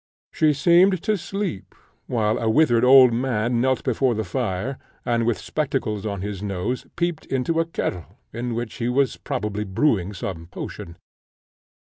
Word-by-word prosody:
She 155 -1 +3
seemed 175 +5 +4
to 215 -1 +2
sleep, 195 - -5 0.3
while 110 -1 0
a 115 - 0
withered 120 -2 +4
old 130 -1 +8
man 120 -1 0
knelt 130 0 +1
before 130 -1 +1
the 110 - -1
fire, 95 +7 -3 0.3
and, 115 -1 +1
with 120 - +1
spectacles 125 -9 -2
on 100 -3 -4
his 100 -2 -5
nose, 100 +5 -3
peeped 170 -2 -2
into 135 +5 0
a 165 - +2
kettle, 90 - -4 0.2
in 120 +1 -3
which 120 -1 -4
he 120 -1 -1
was 135 +2 +1
probably 105 -6 -3
brewing 100 -1 +1
some 85 -3 -5
potion. 85 -1 -8
120 Hz, 155 wpm, -23 LUFS, 105-140 Hz, 0.3 s, old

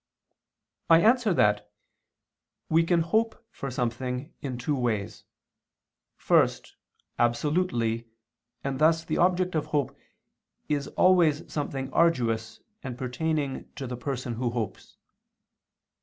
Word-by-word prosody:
I 165 0 +8
answer 235 0 +4
that, 105 -2 +2 1.0
We 160 +1 +4
can 170 0 +2
hope 225 +7 0
for 135 - -6
something 125 +3 -3
in 130 -3 -4
two 135 +4 -1
ways: 115 -6 -2 0.9
first, - - +2 0.4
absolutely, 120 -2 +1 0.6
and 135 -1 -3
thus 160 +1 +4
the - - -1
object 180 +1 +2
of 155 -2 -1
hope 140 -2 -1 0.7
is 145 -2 -1
always 170 -5 +3
something 135 -3 -3
arduous 115 -9 +1 0.2
and 125 -3 -6
pertaining 140 +2 -2
to 135 - -5
the 125 0 -4
person 125 -1 -4
who 120 +1 -1
hopes. 115 -5 -5
135 Hz, 110 wpm, -27 LUFS, 120-165 Hz, 1.0 s, I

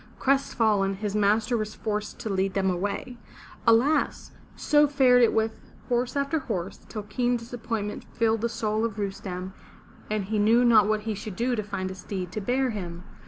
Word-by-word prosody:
Crestfallen, 220 -7 +2
his 205 0 -3
master 210 +3 +2
was 215 -1 -3
forced 210 -1 -3
to - - -5
lead 195 0 0
him 190 -1 +2
away. 205 +6 -3 0.5
Alas! 245 +7 +3 0.2
so 295 0 +4
fared 260 -3 +5
it 235 - +5
with 220 0 -1 0.3
horse 245 +1 0
after 280 +3 0
horse, 195 -9 -4
till 215 -2 -5
keen 245 +3 0
disappointment 230 -3 -5
filled 225 -1 +1
the 235 - 0
soul 215 -1 -1
of 225 -2 -2
Rustem 190 -2 -4 0.6
and 210 -2 -1
he 215 +2 -1
knew 230 +4 +4
not 220 -4 +6
what 215 0 +1
he 220 0 -3
should 205 -1 -7
do 245 +4 0
to 215 - -1
find 195 -2 -4
a - - -5
steed 185 -1 -5
to 215 - -4
bear 250 +4 +1
him. 175 -4 -6
215 Hz, 180 wpm, -26 LUFS, 200-240 Hz, 0.6 s, not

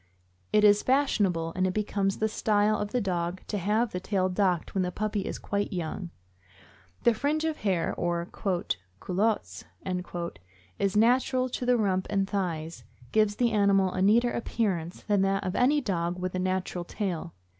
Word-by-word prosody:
It 210 - +4
is 205 0 +6
fashionable, 200 -12 +1
and 185 0 +2
it 185 - -3
becomes 200 -2 0
the 220 - +1
style 215 0 +2
of 205 - -2
the 250 - 0
dog, 175 -1 -2
to 205 - -3
have 215 +5 +1
the 180 - -3
tail 190 0 0
docked 180 -3 0
when 195 - +1
the 180 -1 -1
puppy 210 +2 -2
is - - -3
quite 205 +1 -2
young; 175 0 -4 0.9
the 235 - +5
fringe 295 +7 0
of 315 -1 -1
hair, 185 -5 0
or 170 0 -1
"culottes," 175 - -2 0.2
which 180 - -4 0.4
is 200 0 +1
natural 255 +3 +3
to 250 - -3
the 250 -1 +4
rump 190 -4 0
and 195 -1 +1
thighs, 165 -8 -3 0.3
gives 215 -1 +3
the 240 0 +2
animal 200 -3 +3
a 185 - -2
neater 235 +5 +4
appearance 185 -8 -2
than 205 -2 +2
that 195 0 +1
of 185 -1 -2
any 290 +4 +3
dog 175 -6 -1
with 180 0 -3
the 185 - -3
natural 185 -1 -1
tail. 175 -3 -4
195 Hz, 175 wpm, -28 LUFS, 180-215 Hz, 0.9 s, is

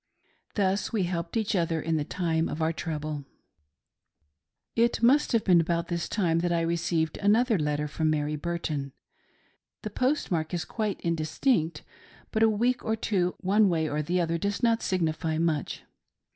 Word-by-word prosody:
Thus 195 -1 +1
we 215 -5 +1
helped 175 +4 -2
each 220 -1 0
other 165 -2 +1
in 165 +1 -1
the 150 - 0
time 165 0 -1
of 155 - -4
our 160 +1 +1
trouble. 155 -3 -4 1.5
It 235 0 +2
must 275 +5 +4
have 230 -2 +2
been 175 -3 +5
about 170 +1 -1
this 170 -1 -2
time 170 -6 +1
that 175 +1 0
I 170 -1 +2
received 165 -1 -1
another 220 +1 +3
letter 150 0 -1
from 155 +2 -1
Mary 150 0 0
Burton. 150 -4 -3 0.9
The - - -4
postmark 185 - 0
is 170 - -3
quite 215 -4 -2
indistinct, 165 - 0 0.5
but 220 - 0
a 225 - +6
week 240 +4 +1
or 220 - 0
two 185 -5 0
one 200 +2 +4
way 160 -2 +1
or 150 0 -1
the 175 +5 0
other 165 -1 0
does 200 +5 -2
not 230 -1 +3
signify 160 -3 -1
much. 160 -3 -1
170 Hz, 165 wpm, -27 LUFS, 160-205 Hz, 1.5 s, a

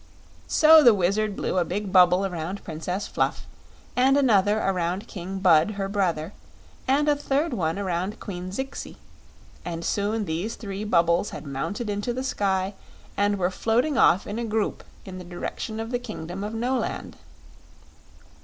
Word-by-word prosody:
So 315 0 +7
the 240 -6 +7
Wizard 200 +3 0
blew 185 - -1
a - - +3
big 190 +3 -4
bubble 180 +1 +6
around 180 +1 -4
Princess 180 +5 -4
Fluff, - - -1 0.5
and 265 +2 +4
another 210 -6 +3
around 185 +1 -1
King 190 +1 -6
Bud, 175 +1 +4
her 195 -1 -2
brother, 185 -4 -1 0.5
and 285 +3 +2
a 295 - +4
third 290 +1 -1
one 165 -5 -1
around 185 0 -2
Queen 180 -2 -6
Zixi; 265 +8 -6 0.7
and 170 -1 -5
soon 210 +1 0
these 175 +7 -3
three 200 -1 -6
bubbles 170 -2 +2
had 150 - -8
mounted 145 - -4
into 205 +3 -2
the 255 +2 -3
sky 195 -6 0 0.4
and 205 0 +1
were 180 -1 0
floating 240 +9 +1
off 190 -4 +4
in 205 +3 -4
a - - -2
group 220 -2 -1 0.2
in 185 -1 -8
the - - -8
direction 180 +5 -5
of 225 +1 -4
the 245 - 0
kingdom 195 -6 -6
of 210 +2 -4
Noland. 250 +3 -2
200 Hz, 160 wpm, -25 LUFS, 180-225 Hz, 0.7 s, So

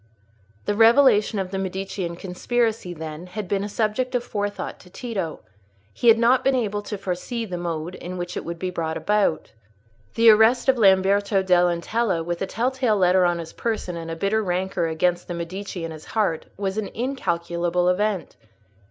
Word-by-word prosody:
The - - +1
revelation 225 -1 +5
of 190 -1 -3
the 195 - -2
Medicean 190 -2 -4
conspiracy, 215 +3 -1
then, 160 +1 -7
had 205 +2 -6
been 200 +1 0
a 205 - -4
subject 230 +5 -1
of 245 - +1
forethought 205 -3 -4
to 180 - -16
Tito; 195 -6 -4
but - - -34 0.4
he 240 - -1
had 225 0 +8
not 240 +3 +4
been 270 0 +3
able 210 -4 -1
to 205 0 -5
foresee 195 +6 -3
the 185 -4 -5
mode 170 0 -4
in 185 0 -7
which 175 0 -5
it - - -3
would 170 0 -5
be 185 +1 -3
brought 160 -2 -3
about. 205 -6 0 0.6
The 230 0 +7
arrest 220 +5 +4
of 265 -2 +3
Lamberto 195 0 +4
dell' 180 -1 +4
Antella 175 +1 -1
with 175 0 -3
a 195 - -1
tell 245 +3 0
tale 255 -5 +1
letter 185 -1 +4
on 175 -1 +1
his 165 -1 -7
person, 220 -6 -3
and 165 -1 -6
a 165 - -3
bitter 200 +6 0
rancour 180 -2 -1
against 175 +2 0
the 175 - -4
Medici 180 +1 -5
in 165 - -6
his 155 -1 -10
heart, 200 -8 -1
was 195 +1 -2
an 215 - -3
incalculable 175 -8 -1
event. 195 +1 0
190 Hz, 190 wpm, -23 LUFS, 175-220 Hz, 0.6 s, had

